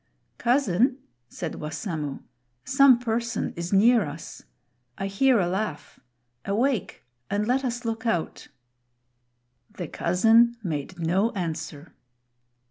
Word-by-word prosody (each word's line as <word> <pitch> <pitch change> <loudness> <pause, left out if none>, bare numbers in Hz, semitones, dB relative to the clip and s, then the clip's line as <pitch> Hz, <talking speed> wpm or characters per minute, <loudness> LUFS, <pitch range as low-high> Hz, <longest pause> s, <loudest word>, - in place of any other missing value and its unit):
"Cousin," 250 0 +2 0.3
said 165 -3 -6
Wassamo, 150 -2 -4 0.4
"some 270 -2 +6
person 235 -1 -2
is 170 +1 -5
near 220 +3 +5
us. 155 +1 -8 0.6
I 195 - -3
hear 235 +5 +3
a 180 - +2
laugh; 190 -3 -4 0.4
awake 230 +3 -1 0.3
and 205 +1 0
let 260 +2 +1
us 240 -1 -3
look 225 +1 -3
out!" 175 -8 -2 1.2
The 185 -6 -7
cousin 225 +9 +3
made 160 0 -4
no 180 +6 +1
answer. 160 -4 -5
205 Hz, 110 wpm, -25 LUFS, 170-235 Hz, 1.2 s, some